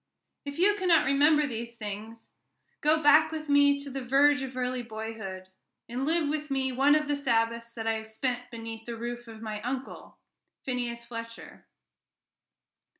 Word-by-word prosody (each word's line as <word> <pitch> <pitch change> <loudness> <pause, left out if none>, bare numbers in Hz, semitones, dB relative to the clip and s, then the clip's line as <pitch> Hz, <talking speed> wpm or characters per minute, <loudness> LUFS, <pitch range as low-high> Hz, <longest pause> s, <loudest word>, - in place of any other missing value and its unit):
If 285 0 -6
you 390 +4 +4
cannot 345 -6 +4
remember 295 +2 +4
these 235 -2 -5
things, 215 +1 -8 0.5
go 310 +1 +3
back 305 +2 +6
with 310 -1 -5
me 285 0 +5
to 280 -1 -7
the 270 0 -4
verge 285 +3 +4
of 260 -1 -6
early 250 0 -1
boyhood, 220 -5 -7 0.4
and 250 +4 -3
live 325 -1 +2
with 300 0 -2
me 265 -1 0
one 275 +4 +4
of 305 -1 +1
the 290 - +1
Sabbaths 230 -3 0
that 225 -1 -6
I 225 0 +1
have 220 0 -8
spent 245 +2 -3
beneath 225 -1 -8
the 235 -1 -5
roof 240 +1 -5
of 225 -1 -10
my 215 -1 -4
uncle, 255 +3 -6 0.5
Phineas 240 -2 -3
Fletcher. 230 -1 -9
250 Hz, 165 wpm, -28 LUFS, 230-285 Hz, 0.5 s, back